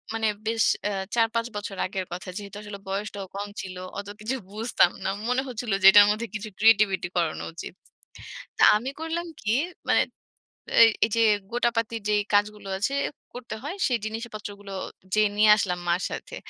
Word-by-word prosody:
মানে 225 -1 +1 0.2
বেশ 225 -1 +2 0.3
আ - - -2 0.2
৪-৫ 230 0 +1
বছর 205 -1 -5
আগের 190 0 -3
কথা। 180 +2 -6
যেহেতু 205 -1 -8
আসলে 205 -1 -8
বয়সটাও 200 0 -4
কম 205 +1 -3
ছিল, 185 -2 -8 0.2
অত 200 - -7
কিছু 240 +5 -2 0.2
বুঝতাম 220 -5 +3
না। - - 0 0.2
মনে 250 +1 +2
হচ্ছিল 235 -3 -4
যে, 190 - +2
এটার 205 0 +9
মধ্যে 225 +2 -2
কিছু 215 0 -5
ক্রিয়েটিভিটি 210 -5 +4
করানো 165 -3 0
উচিত। 165 - -8 0.8
তা - - +3
আমি 245 +5 -4
করলাম 325 +2 -3 0.2
কি, 210 - -3 0.4
মানে - - +4 0.8
এই, 230 - +9 0.2
এই - - -5
যে 230 - +3 0.3
গোটাপাতির 230 -1 0
যে 210 - +3 0.2
কাজগুলো 205 0 +1
আছে, 220 +8 -1 0.4
করতে 245 -2 -7
হয়, 310 +6 -4
সেই 245 -2 +1
জিনিসপত্রগুলো 215 -3 -7 0.4
যেয়ে 215 -1 +4
নিয়ে 215 0 +6
আসলাম 180 -4 -1
মার 175 +2 +2
সাথে। - - -6
215 Hz, 165 wpm, -26 LUFS, 200-230 Hz, 0.8 s, এটার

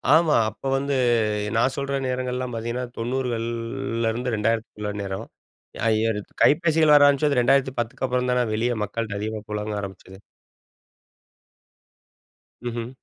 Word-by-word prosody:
ஆமா. 160 -2 +4
அப்போ 110 +6 -8
வந்து 140 +1 -1 0.6
நான் 125 +3 +2
சொல்ற 140 0 -2
நேரங்கள்லாம் 125 -1 -2
பார்த்தீங்கன்னா, 120 +2 -3
90கள் 120 -1 -2 0.6
லருந்து 120 +2 -1
2000க்குள்ள 105 -1 -1
நேரம். 95 0 -4 0.6
அய்யது 110 -1 +1 0.2
கைபேசிகள் 155 -1 +4
வர 145 -1 +8
ஆரம்பிச்சது 145 -1 +2
2010 125 -2 +2
க்கப்புறம் 125 -1 0
தான 125 -1 +2
வெளிய 120 +3 +1
மக்கள்ட்ட 105 0 -3
அதிகமா 110 0 -3
புலங்க 105 0 -3
ஆரம்பிச்சது. 95 0 -9 2.5
ம்ஹ்ம். 120 0 -4
120 Hz, 110 wpm, -24 LUFS, 110-135 Hz, 2.5 s, வர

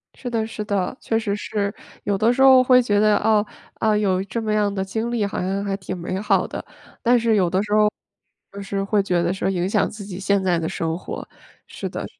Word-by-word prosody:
是 250 - -6
的， 225 -2 -1
是 220 -1 -5
的， 200 +1 -1
确 225 - 0
实 205 -3 -2
是。 205 -1 -2 0.3
有 200 -1 0
的 225 +4 +3
时 265 - -1
候 260 -1 +8
会 255 0 +6
觉 205 -4 +1
得， 210 0 +4
啊， 215 -1 +2 0.3
呃， 215 -1 +2
有 190 -3 +1
这 215 +4 -4
么 215 -1 -2
样 210 -1 +1
的 190 -1 -1
经 220 +5 -3
历 230 -4 0
好 200 - -3
像 195 +2 -1
还 195 -1 -2
挺 190 -1 -6
美 185 +2 -4
好 200 -2 +1
的， - - -6 0.4
但 245 0 +4
是 230 -1 +2
有 185 -4 +2
的 185 +2 +1
时 205 0 -3
候， 210 0 +5 0.6
就 200 - -8
是 195 0 -3
会 200 0 +1
觉 180 -3 +1
得 175 +1 0
说 190 - -1
影 180 -1 -1
响 210 0 +2
自 210 -1 -9
己 190 -2 -7
现 200 0 +1
在 180 -3 +2
的 160 - -2
生 165 0 -2
活， - - -7 0.4
是 - - -6
的。 - - -5
205 Hz, 260 characters per minute, -22 LUFS, 190-220 Hz, 0.6 s, 候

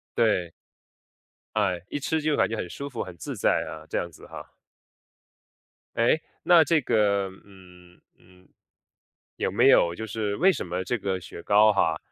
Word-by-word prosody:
对。 95 -7 +1 1.0
哎， 95 -5 0
一 - - -3
吃 160 +3 -1
就 155 -1 +1
感 - - +2
觉 115 - -3
很 90 - -4
舒 140 +8 -7
服 125 -4 -5
很 90 -2 -7
自 - - -6
在 - - +2
啊， 80 0 -9
这 - - -2
样 85 - -3
子 - - -15
哈。 - - -11 1.4
诶， 120 +7 +2 0.2
那 175 -2 +6
这 155 +1 +2
个 100 -5 +1 0.2
嗯， 90 -3 -18 0.2
嗯， 90 0 -22 0.9
有 - - -1
没 - - +4
有 85 0 +4
就 110 - -6
是 105 -1 -3
为 190 +3 +5
什 180 - -5
么 90 +2 -3
这 120 +6 -2
个 95 -3 -3
雪 85 - -10
糕 105 +4 +5
哈， 85 -6 +1
100 Hz, 185 characters per minute, -26 LUFS, 90-115 Hz, 1.4 s, 那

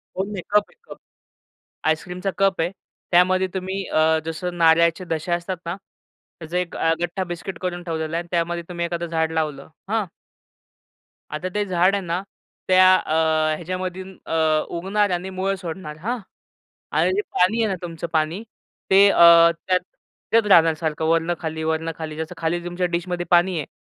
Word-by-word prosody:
कोन 190 +2 -2
नाही, 195 - -4
कप 210 - +4
आहे - - -24
cup. - - -9 0.9
आईस्क्रीमचा 180 +4 -1
cup 195 -2 +2
आहे. 165 +2 +1 0.4
त्यामध्ये 185 +2 +4
तुम्ही 190 +1 -3
अ, 160 0 +3
जसं 175 +2 -4
नारळचे 170 +1 +4
दशा 165 0 -2
असतात 175 +2 -3
ना, 170 +2 -3 0.6
त्याचं 165 +2 -5
एक 180 -1 -2
अ, 165 - +2
गठ्ठा 175 +2 -2
बिस्किट 175 +1 -6
करून 175 -1 -3
ठेवलेला 160 -2 -3
आहे 170 - -1
आणि 175 - -19
त्यामध्ये 170 0 -1
तुम्ही 170 -1 -3
एखादं 170 0 -3
झाड 160 -1 -1
लावलं, 155 -3 -2 0.2
हां? 220 -1 +1 1.3
आता 155 +4 -3
ते 210 - +1
झाड 185 +1 +2
आहे 200 - -1
ना, 170 +2 -1 0.5
त्या 185 0 +7
अ, 155 - -2 0.4
ह्याच्यामधून 185 +2 -5
अ, - - -3 0.4
उगणार 200 +3 +1
आणि 180 +1 -2
मुळं 190 +1 -1
सोडणार, 165 -4 -7
हां? 230 +10 -3 0.8
आणि - - +2
जे 405 - +1
पाणी 220 +6 +2
आहे 220 - +1
ना, 190 - -1
तुमचं 170 -1 -5
पाणी, 160 +5 0 0.5
ते 195 +1 +7
अ, - - 0 0.5
त्यात 185 -1 +2 0.5
येत 225 -2 +5
राहणार 165 -3 +6
सारखं 160 -1 -3
वरनं 165 +1 +2
खाली, 160 -1 -4
वरनं 160 +1 -1
खाली. 155 -1 -6
जसं 160 +2 -5
खाली 170 +1 -1
तुमच्या 175 +1 -1
डिशमध्ये 175 0 -2
पाणी 175 +1 +4
आहे 150 - -4
175 Hz, 170 wpm, -22 LUFS, 165-185 Hz, 1.3 s, त्या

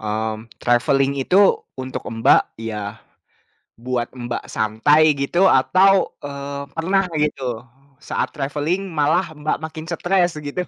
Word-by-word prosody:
mmm, 110 +1 -4
traveling 135 +3 +2
itu 180 - +1 0.4
untuk 130 -1 -5 0.2
Mbak, - - +6 0.3
ya 105 0 -6 0.8
buat 120 -1 -2 0.2
Mbak 120 0 -4
santai 145 +8 +3
gitu 175 +7 +2
atau, 185 +8 +5 0.3
eee, 140 0 -6 0.2
pernah 190 +4 +1
gitu, 135 -6 -2 0.4
saat - - -2
traveling 150 +7 -2
malah 160 +3 +1
Mbak 150 +1 -2
makin 160 0 -6
stres 175 0 +1
gitu. 150 +4 -4
145 Hz, 120 wpm, -21 LUFS, 120-165 Hz, 0.8 s, Mbak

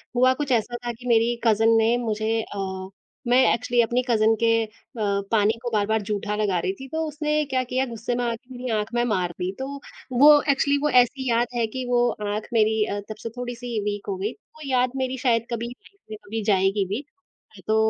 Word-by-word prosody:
हुआ 255 +1 +5
कुछ 280 0 -3
ऐसा 240 0 +1
था 240 - -1
कि 245 +2 -11
मेरी 235 0 +3
कज़िन 225 0 +4
ने 225 +2 +3
मुझे 225 -1 -1
अ, 190 -2 -5 0.4
मैं 245 +1 +4 0.2
एक्चुअली 240 0 +1
अपनी 240 +2 +1
कज़िन 220 -1 +4
के 230 - +4
अ, - - -14 0.6
पानी 215 0 +3
को 240 - -2
बार-बार 215 +1 +1
जूठा 210 0 -2
लगा 205 -4 0
रही 185 +3 -1
थी 270 - -8
तो 320 +3 -2
उसने 300 0 0
क्या 260 -2 0
किया 255 +1 -1
गुस्से 235 0 -4
में 245 - -1
आकर 235 +2 -4
मेरी 250 0 -6
आँख 215 +3 -5
में 240 0 +2
मार 185 -6 0
दी। 180 +1 -1
तो 265 - -3 0.5
वो 295 +1 +8
एक्चुअली 280 +1 +2
वो 300 - +3
ऐसी 255 +1 +3
याद 235 +1 +2
है 235 -1 +1
कि 255 +3 -5
वो, 245 0 +3
आँख 210 0 -4
मेरी 220 -1 +3
अ, 205 -1 -3
तब 215 - -5
से 230 - -3
थोड़ी-सी 245 -2 -4
वीक 205 -1 -3
हो 195 - -1
गई 205 +5 -2
वो 310 - -21
याद 255 -1 +2
मेरी 260 0 -2
शायद 235 -3 +1
कभी 235 0 -3
लाइफ़ 390 +11 -16
में 215 - -5
कभी 220 +1 -4
जाएगी 195 +1 +2
भी 220 +8 -3 0.6
तो 220 - +2
230 Hz, 215 wpm, -24 LUFS, 215-250 Hz, 0.6 s, वो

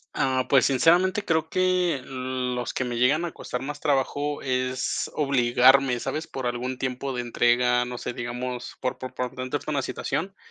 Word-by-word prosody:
Ah, 130 -1 +1
pues, 135 -3 +5
sinceramente, 180 +9 +3
creo 160 -1 +1
que 185 -4 +1
los 125 -1 -3
que - - 0
me 120 -1 -3
llegan 145 +7 +3
a 170 - -4
costar 125 -3 -5
más 145 +1 -5
trabajo 145 0 0
es 130 -1 -1
obligarme, 130 -1 +4
¿sabes?, 155 +6 -3
por 130 -2 -5
algún 125 +1 -2
tiempo 130 +1 -3
de 125 - -2
entrega, 120 +1 +2
no 125 0 -6
sé, 125 - -4
digamos, 125 +1 -5
por 130 0 -3
por 130 - -7
por 125 -1 -3
contexto 130 +4 -4
una 140 -2 +1
situación, 190 +7 -3
130 Hz, 170 wpm, -25 LUFS, 125-145 Hz, -, pues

